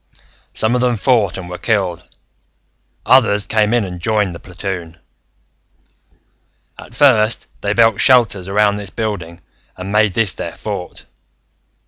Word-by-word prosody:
"Some 110 +2 +1
of 125 - +1
them 125 -1 +1
fought 110 -3 +1
and 95 -2 -7
were 90 0 -8
killed, 95 -7 -1 1.0
others 110 -6 +4
came 110 -1 +1
in 120 -3 +1
and 90 -2 -8
joined 105 -1 0
the 85 - -9
platoon. 90 -3 -6 1.8
"At 120 - -13
first, 120 -6 +3 0.2
they 100 - -1
built 115 -2 +3
shelters 115 -8 +3
around 105 +1 +2
this 100 -2 -6
building 90 -6 -5 0.4
and 95 +2 -6
made 105 -2 +2
this 105 -2 +1
their 85 - -6
fort. 100 -4 -7
105 Hz, 135 wpm, -17 LUFS, 90-115 Hz, 1.8 s, others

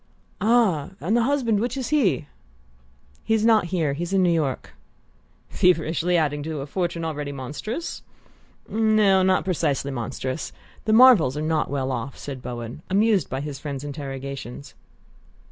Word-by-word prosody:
"Ah 210 -9 +3
and 200 +8 0
the 240 - +4
husband? 245 -6 +1
Which 245 +4 -2
is 260 -3 -3
he?" 240 - +2 1.0
"He's 220 -1 +1
not 220 -4 +5
here 165 -5 0
he's 175 +6 -4
in 190 -1 +4
New 175 - +3
York." 145 -6 -2 0.7
"Feverishly 175 0 +2
adding 145 -2 0
to 155 -1 -4
a - - -4
fortune 170 +1 -2
already 150 -2 -3
monstrous?" 145 - -5 0.7
"No; 215 -3 +3
not 185 0 +2
precisely 145 -6 0
monstrous. 130 +3 -4 0.3
The 215 - +2
Marvells 220 - +6
are - - -2
not 155 -1 0
well 135 -2 -2
off," 125 +2 -4
said 135 -3 -7
Bowen, 120 +2 -6
amused 205 0 +2
by 130 - -3
his 145 -2 -6
friend's 140 -3 -5
interrogations. 140 -2 -7
160 Hz, 145 wpm, -24 LUFS, 140-210 Hz, 1.0 s, Marvells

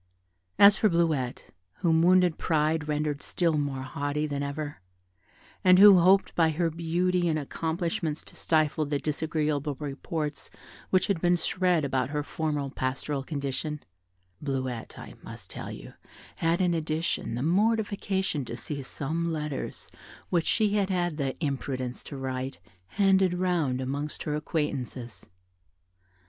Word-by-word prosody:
As 200 +1 +8
for 215 - +3
Bleuette, 160 -8 0 0.3
whom 165 -2 +3
wounded 180 -1 +4
pride 155 -1 +1
rendered 150 -1 -1
still 170 -3 0
more 140 -3 -2
haughty 145 +3 -2
than 145 -2 -3
ever, 145 -5 -4 0.8
and 185 0 +7
who 195 -1 +9
hoped 190 +3 +4
by 165 -2 +3
her 165 +1 0
beauty 175 +2 0
and 160 -2 +1
accomplishments 160 +2 -2
to - - -14
stifle 155 -1 +1
the 145 0 0
disagreeable 150 -1 -1
reports 150 +1 -4 0.4
which 185 - +3
had 195 -5 -1
been 175 0 +3
spread 175 -2 +1
about 130 -2 0
her 150 0 -2
former 150 -2 -2
pastoral 135 +2 -2
condition 145 +1 -3 0.6
Bleuette, 130 -4 -3
I - - -9
must - - -8
tell - - -6
you, - - -10 0.4
had, 165 +2 +1
in 180 -2 +2
addition, 160 -6 -1
the 120 - -2
mortification 195 -3 +1
to 115 - -6
see 140 +4 -5
some 160 +5 -3
letters 150 -3 -4 0.4
which 170 -2 +1
she 210 -2 +2
had 200 -1 +1
had 175 -4 0
the 135 -3 -1
imprudence 130 -3 -3
to 140 - -7
write 130 0 -4 0.3
handed 190 - +3
round 175 -8 0
amongst 140 +3 -3
her 150 - -2
acquaintances. 140 -6 -3
155 Hz, 140 wpm, -28 LUFS, 140-175 Hz, 0.8 s, who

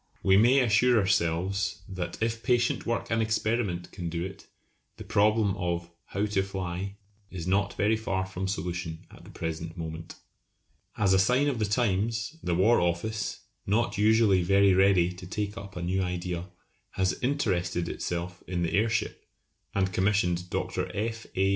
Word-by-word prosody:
We 95 - +5
may 120 +7 +6
assure 120 +1 +4
ourselves 95 0 0
that 95 -3 -5
if 115 0 -1
patient 120 -1 +1
work 115 -1 -2
and 115 0 +2
experiment 110 -5 -1
can 85 -3 -5
do 85 +1 -3
it 95 -1 -9 0.5
the - - -8
problem 105 -1 +2
of 85 -1 -3
"how 100 +2 -1
to 105 -2 +1
fly" 95 0 -4 0.3
is 85 -3 -6
not 100 +2 +1
very 105 +2 +3
far 95 -4 -2
from 95 0 -4
solution 85 -2 -4
at - - -15
the - - -13
present 80 +1 -5
moment. 80 0 -6 0.8
As 100 -2 +3
a 95 - +5
sign 125 +8 +3
of 135 -5 -1
the 110 - +2
times, 110 +4 0
the 85 - 0
War 110 +7 +4
Office, 85 +6 -1 0.3
not 105 0 +1
usually 105 -3 +4
very 100 +2 +4
ready 95 -2 +4
to 90 0 -10
take 105 +2 -3
up 100 -4 -9
a 90 - -4
new 95 +2 0
idea, 90 -1 -3 0.5
has 95 0 +1
interested 90 -11 0
itself 85 +1 -4
in 90 -1 -1
the 85 - -1
airship, 110 +1 0 0.5
and 95 -1 +1
commissioned 90 -2 +1
Dr. - - -2
F. 110 +2 -3
A. 95 +1 +2
95 Hz, 165 wpm, -28 LUFS, 90-110 Hz, 0.8 s, may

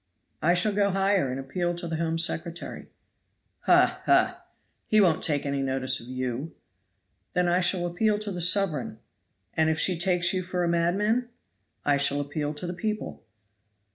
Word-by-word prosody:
"I 175 +3 +3
shall 200 +4 +2
go 200 0 +2
higher 195 -5 +1
and 130 +1 -4
appeal 175 +6 -2
to 175 0 -5
the 160 -1 -3
Home 165 0 -1
Secretary." 165 +1 -2 0.8
"Ha! - - +4
ha! - - +3 0.4
He 215 - +4
won't 180 -6 +3
take 145 -4 +1
any 140 -1 -1
notice 130 -1 0
of 115 - -11
you." 130 +4 -4 0.8
"Then 180 0 +1
I 175 +1 +3
shall 175 0 +1
appeal 205 +5 +1
to 210 -1 -3
the 180 -2 -4
sovereign." 170 - +1 0.6
"And 160 0 +2
if 160 - 0
she 180 -3 +2
takes 175 -1 +2
you 185 - 0
for 180 0 -2
a - - +1
madman?" 200 +8 +1 0.6
"I 145 -1 +3
shall 140 0 +2
appeal 145 +1 -3
to 150 - -4
the 175 - -4
people. 215 +3 -4
175 Hz, 170 wpm, -26 LUFS, 145-185 Hz, 0.8 s, Ha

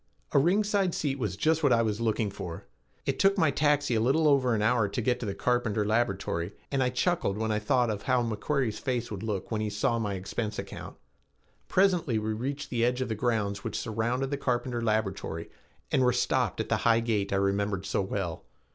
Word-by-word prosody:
A - - +5
ringside 195 +3 +2
seat 140 -2 -1
was 105 -6 -2
just 160 +4 +2
what 145 -4 +3
I 115 -1 +4
was 110 0 -1
looking 110 -2 0
for. 90 -4 -7 0.4
It - - -1
took 195 +1 +4
my 160 -5 +4
taxi 145 -2 +2
a 110 - +2
little 145 +7 +3
over 130 -5 +3
an 105 - 0
hour 110 -1 +3
to - - -3
get 120 +1 +1
to 115 - -4
the 100 - -3
Carpenter 115 -3 0
laboratory 100 -5 0 0.2
and 135 -1 +1
I 125 - +2
chuckled 125 - 0
when 110 0 -1
I 105 - +1
thought 120 +2 +2
of 105 -1 -4
how 125 +1 +2
McQuarrie's 115 +1 -1
face 120 -3 -2
would 100 -3 -5
look 105 -2 -3
when 110 -1 0
he 110 - -1
saw 105 +3 0
my 105 -3 -2
expense 105 +3 -4
account. - - -7 0.7
Presently 180 - +2
we 110 0 -1
reached 140 +6 -4
the 120 -2 +1
edge 125 +2 +1
of 130 - -2
the - - 0
grounds 105 -3 -1
which - - -3
surrounded 120 +5 -1
the 140 - 0
Carpenter 120 -2 -1
laboratory 110 -7 -2 0.4
and 130 - +3
were 125 -1 +4
stopped 125 - 0
at - - -2
the - - +2
high 115 0 +3
gate 110 -4 -1
I - - +1
remembered 100 0 0
so 100 - 0
well. 95 -3 -3
115 Hz, 215 wpm, -28 LUFS, 105-130 Hz, 0.7 s, A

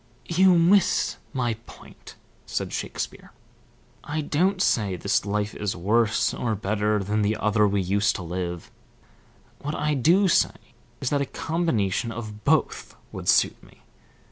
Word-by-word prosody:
"You 180 +1 +4
miss 180 +3 +3
my 120 -4 -1
point," - - -14 0.3
said - - -3
Shakespeare. - - -5 0.7
"I 155 +1 -3
don't 180 +6 +1
say 105 - +1
this 90 - 0
life 105 +1 -1
is 105 -2 -3
worse 110 +5 +1
or 115 -3 -2
better 105 +1 0
than 105 +2 0
the 105 +1 +1
other 105 -1 +2
we 100 0 0
used 100 +3 +1
to 90 - -5
live. 90 0 -5 0.9
What 150 +2 -4
I 150 +1 0
do 170 +9 +4
say 175 - +2 0.4
is 130 - -1
that 145 -1 +1
a - - 0
combination 120 - -1
of 110 -2 -8
both - - 0 0.2
would - - -4
suit - - +3
me. - - -21
110 Hz, 145 wpm, -25 LUFS, 100-150 Hz, 0.9 s, You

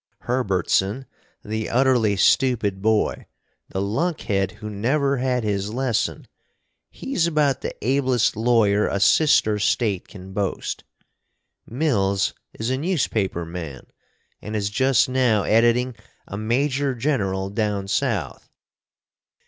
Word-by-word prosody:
Hurburtson 105 0 0 0.4
the 110 0 -3
utterly 120 -5 +3
stupid 105 -3 +2
boy 110 0 +1 0.4
the 95 - -2
lunkhead 105 - -1
who 105 - -9
never 135 +7 0
had 125 -1 0
his 100 -1 -1
lesson, 120 -3 -1 0.6
he's 185 -11 -1
about 150 -5 +1
the - - -4
ablest 130 -2 +2
lawyer 110 -2 +3
a 100 - -1
sister 110 -3 +4
State 100 -2 0
can 95 -2 -11
boast. 100 -1 -3 0.8
Mills 100 -8 0 0.2
is 115 +3 -3
a 130 - -1
newspaper 115 - -1
man, 80 -6 -7 0.6
and 105 +1 -6
is 100 -1 -1
just 130 +3 +3
now 125 -5 +2
editing 120 +2 +2 0.3
a - - -6
Major 130 +5 0
General 100 -8 -1
down 105 -2 -1
South. 105 - -2
110 Hz, 115 wpm, -23 LUFS, 100-130 Hz, 0.8 s, sister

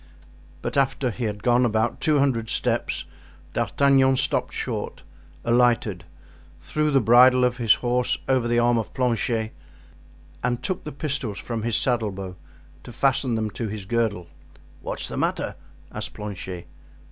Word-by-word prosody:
But - - -2
after 135 -2 +1
he 120 +2 -4
had 105 -1 -4
gone 120 0 +4
about 110 -2 0
two 155 -1 +3
hundred 125 -5 +1
steps - - -1 0.5
D'Artagnan 135 -1 +3
stopped - - 0
short, - - -4 0.4
alighted, 115 -6 +2 0.5
threw 150 0 -1
the 140 -2 +4
bridle 125 +2 +6
of 125 0 0
his 115 -4 +5
horse 125 0 0
over 130 -3 +2
the 120 0 +1
arm 120 0 +3
of 110 - -6
Planchet 115 -3 0 0.9
and 120 -1 -1
took 185 -2 -3
the 150 - -5
pistols 140 -8 -3
from 115 -2 -4
his 115 0 -1
saddle 120 -4 +1
bow 95 -1 -7 0.5
to - - -10
fasten 135 -3 +1
them 110 -1 -1
to 110 +5 -4
his 105 -2 -6
girdle. 110 -4 0 0.6
"What's - - -3
the - - -6
matter?" - - -1 0.4
asked - - -6
Planchet. 95 -4 -6
120 Hz, 150 wpm, -24 LUFS, 110-130 Hz, 0.9 s, bridle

